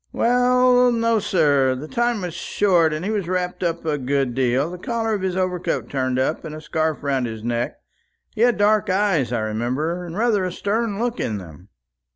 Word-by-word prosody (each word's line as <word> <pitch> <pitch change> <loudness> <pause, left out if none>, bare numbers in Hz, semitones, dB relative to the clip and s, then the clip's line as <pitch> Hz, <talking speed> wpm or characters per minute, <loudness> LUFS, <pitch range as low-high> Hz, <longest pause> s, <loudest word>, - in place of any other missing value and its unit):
"Well 250 +1 +4
no, 230 -1 +2
sir. 145 -9 +2
The 140 +4 -7
time 240 +2 0
was 180 -2 -4
short, 170 -2 +2
and 155 +3 -3
he 210 - -1
was 205 -5 -2
wrapped 180 0 -2
up 170 -2 -2
a 150 -2 0
good 135 -1 0
deal; 130 +5 +1
the 180 - -8
collar 225 +2 -2
of 205 - -2
his 185 -1 -1
overcoat 180 -9 -1
turned 130 -2 -1
up, 130 +4 -1
and 155 - -7
a - - -7
scarf 155 0 -2
round 135 -3 0
his 110 -1 -7
neck. 120 +1 -2 0.6
He - - -4
had 240 -1 +4
dark 205 0 +3
eyes, 185 -10 +1
I 120 - 0
remember, 125 +11 -2
and 175 +1 -7
rather 220 -3 +2
a 185 - -2
stern 205 +3 -1
look 240 +2 -2
in 110 - -2
them." 90 0 -12
175 Hz, 200 wpm, -22 LUFS, 135-210 Hz, 0.6 s, Well